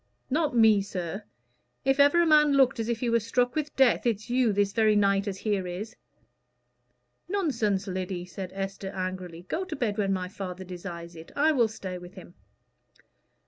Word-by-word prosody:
"Not 295 -4 +1
me, 220 -3 +6
sir. 195 +1 -5 0.6
If 270 +1 +2
ever 285 +5 +6
a - - +2
man 300 -2 +5
looked 270 -2 +4
as 225 +1 -2
if 235 -1 -2
he 245 - 0
was 230 -2 +2
struck 245 +2 +1
with 300 -1 -3
death, 260 -2 +3
it's 220 +1 -2
you, 250 -2 +3
this 200 0 +1
very 215 -1 +3
night 200 0 +2
as 195 -1 -3
here 200 -3 -1
is." 190 +5 -6 1.3
"Nonsense, 235 - 0
Lyddy," 185 -2 -4
said 185 +1 -7
Esther, 195 0 -4
angrily. 185 -2 -5
"Go 350 - -2
to 370 - -5
bed 220 -5 -2
when 195 -1 +1
my 185 -1 -1
father 185 -1 -7
desires 175 -2 -8
it. 160 0 -11
I 305 +2 +4
will 245 -6 +3
stay 190 -4 -7
with 175 +1 -12
him." 180 -2 -12
205 Hz, 185 wpm, -27 LUFS, 185-245 Hz, 1.3 s, me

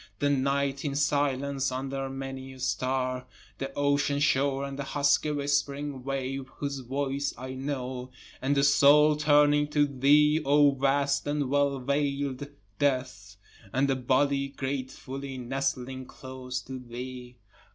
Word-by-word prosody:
The 145 +4 +1
night 140 0 0
in 140 -2 -2
silence 140 -2 0
under 135 +1 -3
many 135 0 -6
a 130 - -13
star, 130 0 -1 0.3
The 135 0 -4
ocean 145 0 +1
shore 140 -1 +2
and 140 0 -5
the - - -1
husky 140 +2 +2
whispering 145 -1 -1
wave 135 0 -3
whose 140 -1 -3
voice 135 +2 -2
I 130 +1 -6
know, 130 -2 -4 0.3
And 140 +2 +1
the 140 - +3
soul 145 +2 +6
turning 145 0 +4
to 150 0 +2
thee 145 +3 +4
O 145 0 +5
vast 140 +1 +1
and 145 -2 -1
well 140 -1 +2
veil'd 140 0 -1 0.3
death, 125 -7 -1 0.4
And 135 +5 +2
the 135 - +2
body 140 +2 +1
gratefully 135 0 -5
nestling 130 0 -3
close 130 -1 -6
to 130 0 -7
thee. 125 0 -8
135 Hz, 135 wpm, -28 LUFS, 130-145 Hz, 0.4 s, soul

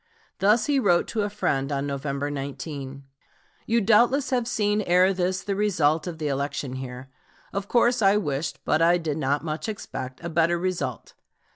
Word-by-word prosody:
Thus 210 +4 +4
he 285 -2 +2
wrote 175 -8 +3
to 220 - -1
a 205 - -1
friend 140 -9 -1
on 140 0 -1
November 140 0 -3
19: 140 -1 -6 0.6
"You 230 +1 +2
doubtless 240 +7 +3
have 245 -3 +1
seen 210 -3 +1
ere 185 0 +4
this 185 +1 -1
the 200 - -2
result 165 -6 +1
of 170 -2 -5
the 155 -2 -3
election 140 -1 -2
here. 130 0 -8 0.4
Of 200 0 -3
course 240 +1 +3
I 200 0 +5
wished, 145 -5 -3
but 155 - +2
I 170 +1 +5
did 160 -3 -3
not 140 +1 0
much 155 +6 -3
expect, 130 -11 -6
a - - -3
better 170 +1 +2
result.... 170 - -3
170 Hz, 175 wpm, -25 LUFS, 140-205 Hz, 0.6 s, I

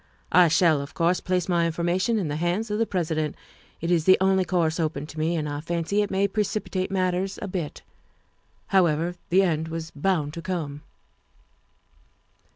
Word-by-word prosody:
I 180 0 +7
shall, 160 -2 +3
of 140 +2 -9
course, 170 +2 +2
place 180 -1 -1
my 170 -2 +2
informa 175 +2 0
tion 230 +2 +1
in 190 -6 -1
the 145 0 -2
hands 180 +7 -1
of 210 - -1
the 230 - +1
President; 160 -4 -1 0.5
it 170 +2 -1
is 165 -3 +2
the 185 - +7
only 190 0 +3
course 170 -2 0
open 155 -3 -1
to 155 0 -9
me, 165 +2 +1
and 155 -2 -2
I 145 0 -4
fancy 170 +5 -1
it 205 - -1
may 195 +1 +1
precipitate 200 -2 -2
matters 185 0 -1
a 205 - -5
bit. 180 -5 -5 0.9
However, 170 -2 +2 0.2
the 190 +3 +4
end 160 -3 0
was 165 0 -5
bound 150 -1 -1
to 170 - -6
come. 165 -5 -4
175 Hz, 180 wpm, -25 LUFS, 160-190 Hz, 0.9 s, I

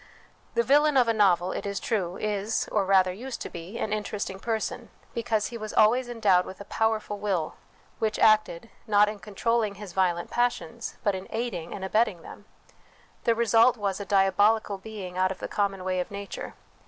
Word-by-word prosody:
The 470 - +3
villain 295 - +4
of 250 -2 +5
a 230 - +3
novel, 185 -4 +3
it - - -4
is 200 -1 -3
true, 185 -6 -2
is, 210 +1 -1
or 205 -2 +1
rather 190 -1 +4
used 245 +6 -6
to - - -6
be, 170 +6 -8
an 215 - -2
interesting 205 -2 -3
person, 220 +1 -3 0.2
because 225 -3 -1
he 235 - -7
was 215 -1 -6
always 240 +4 +4
endowed 205 -6 +3
with 190 - -10
a 200 - -8
powerful 220 -1 -1
will, 190 -7 -1 0.5
which 220 -2 0
acted, 215 -2 +3 0.2
not 210 -1 +5
in 210 -1 -7
controlling 210 +2 -1
his 200 -3 -9
violent 175 -2 0
passions, 240 -9 -2
but 205 - +2
in 190 0 -6
aiding 220 -8 -4
and 190 - -5
abetting 200 -3 +1
them: 205 - -12 0.8
the 230 - +3
result 235 +2 +4
was 200 -2 -2
a - - -3
diabolical 200 +1 +2
being 190 -3 -7
out 185 0 +3
of 190 - -5
the - - -5
common 195 -2 -1
way 185 0 -1
of 180 - -3
nature. 200 0 -7
205 Hz, 190 wpm, -27 LUFS, 190-225 Hz, 0.8 s, of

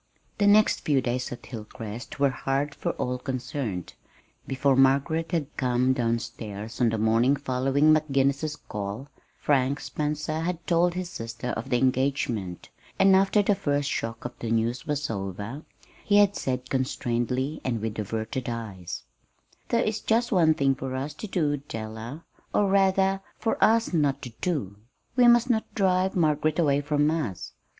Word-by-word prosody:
The 205 - +4
next 210 +1 +5
few 145 -3 +2
days 125 0 -2
at 125 - -7
Hilcrest 110 +1 -8
were 140 -1 +4
hard 135 +3 -1
for - - -3
all 125 0 -2
concerned. 125 - -4 0.5
Before 135 0 +2
Margaret 140 +5 +3
had 160 -5 -2
come 125 0 +2
down 115 -2 +1
stairs 110 0 -7
on 120 - +5
the 110 - -1
morning 115 +5 +3
following 135 +3 +2
McGinnis's 140 0 +1
call, 105 +6 -6 0.3
Frank 140 0 +1
Spencer 150 +1 -2
had 170 0 -3
told 175 +1 +2
his 180 -1 -4
sister 115 +2 -5
of 135 - -4
the 125 - +3
engagement; 130 - 0 0.3
and 195 0 +6
after 195 +2 +4
the 205 - +3
first 145 -7 -1
shock 115 +1 -4
of 125 - -3
the 115 - -4
news 115 +2 0
was 150 -1 -1
over, 100 +6 -5 0.4
he 205 - +3
had 205 -1 +5
said 130 0 -3
constrainedly, 130 +2 -1
and 120 -3 -1
with 110 0 -4
averted 110 +4 -3
eyes: 105 -7 -6 0.6
"There 235 - +2
is 215 0 -1
just 235 +3 +1
one 165 -6 +4
thing 135 -2 +2
for 130 0 -5
us 140 +3 -3
to 185 +9 -7
do, 155 -7 0
Della 115 +2 -7 0.3
or 205 - +3
rather, 195 0 +3 0.2
for 225 - 0
us 225 -2 +3
not 145 -4 +1
to 125 - -6
do. 130 - -2 0.4
We 250 -1 +6
must 240 +1 +5
not 220 -2 -2
drive 190 -1 +2
Margaret 155 -2 +2
away 145 -4 +3
from 150 +1 +1
us. 145 - -3
135 Hz, 160 wpm, -26 LUFS, 120-160 Hz, 0.6 s, and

